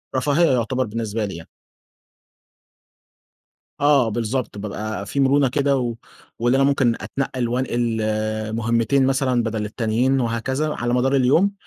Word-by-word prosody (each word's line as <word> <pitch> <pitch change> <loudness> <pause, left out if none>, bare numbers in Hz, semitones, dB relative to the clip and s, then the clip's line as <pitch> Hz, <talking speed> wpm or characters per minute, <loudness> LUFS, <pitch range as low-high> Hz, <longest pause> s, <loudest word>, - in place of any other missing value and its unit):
رفاهية 150 +5 +2
يُعتبر 130 +1 0
بالنسبة 110 -1 -3
لي 95 - -6
يعني. 85 -1 -10 2.3
آه 140 -4 +4
بالضبط، 115 +1 -3
بابقى 105 0 -5
في 140 - -2
مرونة 135 0 +3
كده، 140 +1 +1
و 120 -2 -2 0.4
واللي 120 +3 +2
أنا 135 - +3
ممكن 135 -4 +2
أتنقّل 130 -3 -3
وانقل 120 -2 -1 0.6
مهمتين 115 +4 +1
مثلًا 130 -2 +1
بدل 110 -2 -2
التانيين 115 +5 0
وهكذا، 130 +6 -1
على 120 0 -2
مدار 135 +2 +2
اليوم، 145 +10 +3
125 Hz, 130 wpm, -21 LUFS, 115-135 Hz, 2.3 s, آه